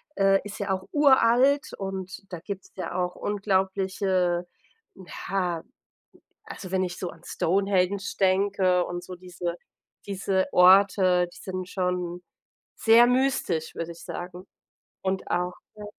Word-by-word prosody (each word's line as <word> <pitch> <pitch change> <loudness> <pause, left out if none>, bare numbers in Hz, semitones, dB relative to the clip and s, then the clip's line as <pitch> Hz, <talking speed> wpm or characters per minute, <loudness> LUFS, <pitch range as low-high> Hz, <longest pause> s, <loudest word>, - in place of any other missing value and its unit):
äh, 195 0 +4
ist 205 +1 -8
ja 200 - -3
auch 190 0 -1
uralt 275 -1 +4
und 190 -1 -5
da 175 - -5
gibt's 200 +1 -7
ja 185 -3 -5
auch 180 -1 -1
unglaubliche 190 -3 0 0.8
ja, 180 -4 -1 0.8
also, 185 -1 -9
wenn 185 0 +1
ich 180 -1 -4
so 180 - -4
an 165 - -17
Stonehenge 195 +1 +1 0.2
denke 190 -1 +2
und 175 0 -5
so 180 0 -8
diese 175 -1 -5 0.5
diese 195 -1 0
Orte, 185 -1 +5
die - - -15
sind 185 -1 -6
schon 180 -2 -2 0.5
sehr 230 +1 +6
mystisch, 250 -11 0
würde 165 0 -4
ich 170 - -12
sagen 180 +1 -7 0.5
und 190 0 -2
auch 180 0 0 0.2
we 210 -1 -9
190 Hz, 130 wpm, -26 LUFS, 180-200 Hz, 0.8 s, sehr